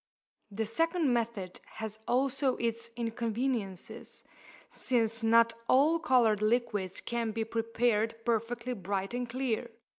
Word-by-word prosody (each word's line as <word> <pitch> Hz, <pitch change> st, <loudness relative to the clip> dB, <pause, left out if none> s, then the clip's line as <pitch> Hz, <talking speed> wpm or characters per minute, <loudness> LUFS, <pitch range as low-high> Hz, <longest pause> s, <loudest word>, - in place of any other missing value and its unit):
The 220 Hz, +2 st, -2 dB
second 330 Hz, -, +1 dB
method 225 Hz, -6 st, -2 dB
has 220 Hz, -1 st, -6 dB
also 265 Hz, +1 st, +2 dB
its 230 Hz, 0 st, -2 dB
inconveniences, 230 Hz, -3 st, -3 dB, 0.5 s
since 230 Hz, -2 st, 0 dB
not 230 Hz, +1 st, +5 dB, 0.2 s
all 300 Hz, +6 st, +5 dB
coloured 240 Hz, -9 st, +3 dB
liquids 215 Hz, -4 st, 0 dB
can 235 Hz, -1 st, -2 dB
be 225 Hz, +1 st, -1 dB
prepared 225 Hz, 0 st, 0 dB
perfectly 235 Hz, +1 st, -1 dB
bright 195 Hz, 0 st, -3 dB
and 245 Hz, -1 st, -2 dB
clear. 245 Hz, -1 st, -1 dB
230 Hz, 115 wpm, -31 LUFS, 220-245 Hz, 0.5 s, not